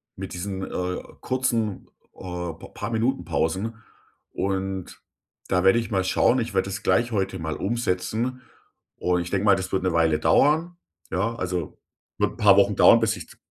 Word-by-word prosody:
mit - - -7
diesen, 95 +1 -4
äh, 90 0 -3 0.2
kurzen, 115 -6 -1 0.3
äh, 90 -2 -5
p - - -12
paar - - -5
Minutenpausen. 115 -4 -1 0.6
Und 95 -1 -3 0.5
da 90 0 +2
werde 95 +4 +5
ich 115 -1 -5
mal 95 -2 +1
schauen. 120 +6 +3
Ich 115 -3 -3
werde 95 0 +2
das 100 - -4
gleich 120 0 +2
heute 95 -3 -1
mal 80 -1 -3
umsetzen. 115 +3 -2 0.6
Und 90 0 +1
ich 85 - -5
denke 100 +1 0
mal, 100 - +6
das 95 0 -5
wird 95 -1 0
'ne 95 -2 +1
Weile 80 -2 +3
dauern. 150 - +3 0.4
Ja, 110 +6 -1
also 90 -5 -4 0.4
wird - - +2
'n - - -17
paar 100 -2 +6
Wochen 100 0 +4
dauern, 115 - +7
bis 110 0 +1
ich - - -9
d - - -17
95 Hz, 180 wpm, -24 LUFS, 90-115 Hz, 0.6 s, dauern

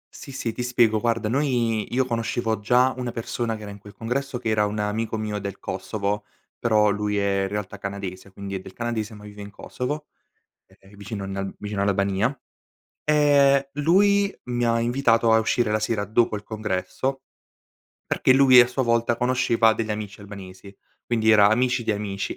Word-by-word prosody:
Sì 140 - -10
sì, 125 -3 -3
ti - - -5
spiego. 120 -3 +2
Guarda 115 -1 0
noi 120 -4 0
io 130 +1 +1
conoscevo 115 -2 -1
già 125 +5 +3
una 125 -1 -3
persona 115 0 -3
che 110 - -9
era 105 - -7
in 100 - -11
quel 105 +1 -14
congresso 130 +3 -3
che 120 -2 -3
era 105 -1 +2
un 105 +1 -4
amico 110 +2 -2
mio 105 -1 -3
del 100 -1 -6
Kosovo, 105 0 -3 0.3
però 105 -3 +3
lui 105 0 -1
è 100 -1 +1
in 95 - 0
realtà 105 0 -5
canadese 100 -1 -6
quindi 100 +1 -7
è 95 - -2
del 95 0 -12
canadese 115 -1 -3
ma 105 - -13
vive 105 0 -10
in 100 - -8
Kosovo, 145 +8 -5 0.6
e - - -24
ehm 95 +2 -18
vicino 100 0 -6
a - - -5
nal 95 0 -4
vicino 105 -1 -3
all'Albania. 100 +5 +1 0.7
Ehm, 140 -2 +4
lui 200 +6 +3
mi 120 0 0
ha 115 0 +2
invitato 115 -2 +2
a 110 - +6
uscire 110 0 +1
la 110 - +1
sera 110 -1 -1
dopo 110 +2 +1
il 105 - -6
congresso, 110 +5 -3 0.8
perché 130 - +2
lui 130 -2 +8
a 120 - +6
sua 125 +2 -2
volta 115 -1 +1
conosceva 120 -2 +3
degli 110 0 -3
amici 105 -1 -5
albanesi, 100 -1 -11 0.3
quindi 110 -2 +2
era 105 -2 +7
amici 125 +2 +1
di - - 0
amici. 100 -1 -4
110 Hz, 190 wpm, -24 LUFS, 105-125 Hz, 0.8 s, lui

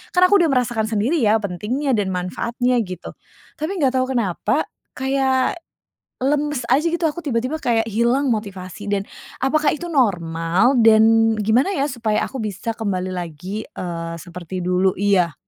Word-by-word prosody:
kan 360 - +5
aku 405 +1 +5
udah - - +3
merasakan 240 -4 +1
sendiri 225 +9 0
ya 215 0 +4
pentingnya 215 +9 -2
dan 205 -3 0
manfaatnya, 235 +7 -1
gitu. 185 -3 -8 0.5
Tapi 310 +4 -2
nggak 265 -1 +2
tahu 255 +1 -1
kenapa 200 -8 0 0.3
kayak 265 +2 +1 0.6
lemes 290 -1 0
aja, 280 +5 +3
gitu. 340 +1 -2
Aku 305 +3 -6
tiba-tiba 255 +2 -1
kayak 225 -2 +1
hilang 240 +6 +1
motivasi 200 -1 -6
dan 200 -1 0 0.4
apakah 300 +2 +2
itu 310 +3 -5
normal? 180 - +2
Dan 225 0 +5
gimana 220 - +2
ya 275 - +1
supaya 235 -6 -1
aku 265 - -6
bisa 215 +2 -3
kembali 185 -4 -2
lagi, 180 +4 -5
eee, 165 -1 -5
seperti 180 +1 -7
dulu? 180 +1 +2
Iya. 185 -4 +2
225 Hz, 150 wpm, -21 LUFS, 185-265 Hz, 0.6 s, kan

